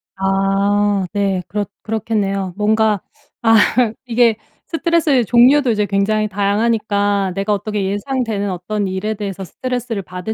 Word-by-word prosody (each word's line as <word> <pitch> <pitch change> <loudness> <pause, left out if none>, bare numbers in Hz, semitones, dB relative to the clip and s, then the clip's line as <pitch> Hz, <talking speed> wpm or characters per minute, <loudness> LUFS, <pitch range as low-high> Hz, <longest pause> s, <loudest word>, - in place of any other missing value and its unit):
아 195 +1 +1
네. 195 -3 0
그렇 205 +2 -2 0.2
그렇겠네요. 200 -4 -2
뭔가 215 -1 +2 0.4
아 225 -1 +4 0.5
이게 235 -2 +3 0.3
스트레스의 330 -6 +1
종류도 250 +3 +5
이제 210 -1 +1
굉장히 215 +2 +1
다양하니까 205 -1 0
내가 200 +2 0
어떻게 205 0 -2
예상되는 205 0 -2
어떤 195 +3 -3
일에 190 +3 -2
대해서 200 -3 -5
스트레스를 245 +3 -4
받을 180 +3 -6
205 Hz, 320 characters per minute, -18 LUFS, 195-225 Hz, 0.5 s, 종류도